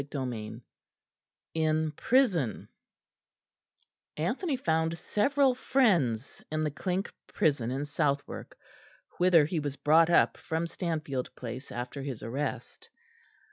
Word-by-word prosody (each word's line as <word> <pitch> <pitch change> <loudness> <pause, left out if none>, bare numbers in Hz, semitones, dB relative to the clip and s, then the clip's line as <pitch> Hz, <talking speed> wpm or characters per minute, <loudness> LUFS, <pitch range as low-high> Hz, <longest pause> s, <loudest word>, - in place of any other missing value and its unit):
CHAPTER 140 0 -6
XIII 110 -1 -6 0.9
IN 155 -1 +1
PRISON 180 - +1 1.5
Anthony 265 - -1
found 160 -5 0
several 270 - +2
friends 175 - +1
in 155 0 0
the 150 - 0
Clink 185 +6 -2
prison 140 -7 +1
in 135 +3 -2
Southwark, 145 -1 -2 0.6
whither 175 -4 +6
he 165 +2 -1
was 145 -2 -3
brought 160 +3 +4
up 170 - +4
from 160 +1 -2
Stanfield 155 -7 -3
Place 125 +2 -7
after 125 +3 -5
his 135 -6 -5
arrest. 135 +6 -4
155 Hz, 110 wpm, -29 LUFS, 135-175 Hz, 1.5 s, whither